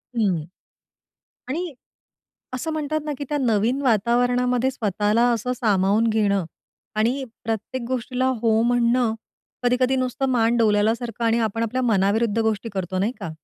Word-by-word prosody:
हं. 190 -9 +1 1.1
आणि 335 +5 -3 0.8
असं 290 +6 -3
म्हणतात 310 0 -2
ना, 300 - -2
की 285 - -4
त्या 295 -1 -1
नवीन 235 +1 +1
वातावरणामध्ये 245 +2 +2
स्वतःला 215 -1 +1
असं 235 +2 -1
सामावून 210 0 +2
घेणं 200 -3 +1 0.5
आणि 245 +5 +1 0.2
प्रत्येक 225 +3 -3
गोष्टीला 255 0 -1 0.2
हो 225 -1 +3
म्हणणं, 240 -1 +2 0.5
कधी-कधी 250 +1 +2
नुसतं 255 +1 -1
मान 235 -1 +2
डोलवल्यासारखं 225 +2 +1
आणि 230 +1 +3
आपण 225 0 -1
आपल्या 250 +3 -1
मनाविरुद्ध 220 0 +2
गोष्टी 220 0 0
करतो 185 -1 -3
नाही 205 +5 0
का? 190 - -4
230 Hz, 135 wpm, -23 LUFS, 215-250 Hz, 1.1 s, हो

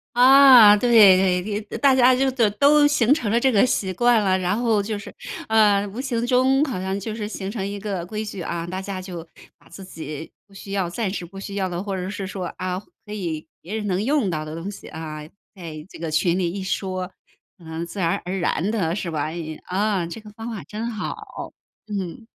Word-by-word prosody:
啊， 255 -4 +9
对 240 +4 0 0.5
对， 210 0 -4
呃， - - -4
大 265 +3 +4
家 255 0 +5
就 265 +1 +2
都 235 -5 +2
都 290 +6 +5
形 265 -3 +3
成 235 -9 -1
了 235 - +3
这 265 +2 +3
个 210 0 +4
习 190 -6 -1
惯 240 +3 +4
了， 190 -1 +2
然 185 +3 0
后 225 -4 +2
就 210 +1 -3
是， 200 - -10 0.3
呃， 210 -2 +4
无 215 +6 -6
形 240 -4 -2
中 260 +3 +3
好 255 -10 -4
像 190 +1 -2
就 215 +2 -5
是 215 -1 -4
形 200 -2 -5
成 205 -3 -3
一 200 0 -5
个 195 -4 -4
规 215 +3 -4
矩 200 -3 -6
啊， 170 0 -4
大 185 +2 -5
家 190 -1 -5
就 180 -3 -7 0.4
把 - - -22
自 195 - -11
己 155 -3 -8 0.2
不 200 - -22
需 195 0 -10
要 190 -3 -1
暂 195 +2 -2
时 180 - -5
不 195 +3 -11
需 200 0 -7
要 190 -2 -1
的， 175 +2 -4
或 200 -2 -3
者 185 0 -4
是 200 -1 -5
说， 190 -1 -5
啊， 185 0 -3 0.3
可 210 - -8
以 165 -6 -4
别 190 +6 -6
人 215 -1 -3
能 190 0 0
用 270 -4 +1
到 155 -3 -2
的 155 +1 -7
东 170 +4 -5
西 - - -11
啊， 155 -1 -7 0.4
在 160 -4 -8
这 - - -12
个 165 -1 -3
群 170 +3 +1
里 175 -2 0
一 195 +1 -5
说， 185 -1 -3 0.5
呃， 165 0 -6
自 180 +4 -8
然 170 -2 +1
而 185 +2 -3
然 180 +3 0
的 180 -6 0
是 175 -5 -4
吧， 150 -1 -2 0.4
啊， 195 -1 0
这 170 - -7
个 215 - -12
方 225 +2 -7
法 210 -8 -6
真 215 +9 -5
好。 215 -3 -6 0.3
嗯。 200 +1 -5
200 Hz, 240 characters per minute, -23 LUFS, 180-225 Hz, 0.5 s, 啊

